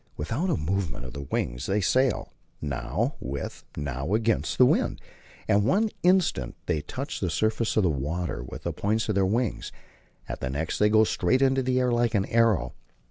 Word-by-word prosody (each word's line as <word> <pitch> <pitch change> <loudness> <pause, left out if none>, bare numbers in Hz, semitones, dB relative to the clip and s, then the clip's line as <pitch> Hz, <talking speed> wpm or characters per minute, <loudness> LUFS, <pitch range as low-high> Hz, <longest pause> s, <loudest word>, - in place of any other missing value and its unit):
Without 140 - -1
a - - +1
movement 80 -5 -2
of 65 - -8
the 70 - -6
wings - - -2
they 100 +2 +1
sail, 130 +6 +1 0.3
now 70 -4 -2
with, 70 +2 -5
now 70 +5 -2
against, 115 0 0
the 125 - +7
wind; - - +1 0.5
at 100 - +4
one 205 - +2
instant 180 - +2
they 75 - 0
touch 135 - -5
the 95 - -1
surface 110 +7 0
of 110 - +4
the 90 - +3
water 75 0 -3
with 60 - -9
the - - -2
points 110 +2 -1
of - - +2
their 95 -1 +2
wings, 115 +2 -1 0.6
at - - -5
the - - -3
next 75 +5 -2
they 105 - +5
go 110 +1 +5
straight 110 +5 +2
into 135 0 +3
the 130 0 +1
air 125 -1 +2
like 120 -1 +1
an 100 -1 +2
arrow. 115 -4 +2
105 Hz, 190 wpm, -26 LUFS, 75-120 Hz, 0.6 s, the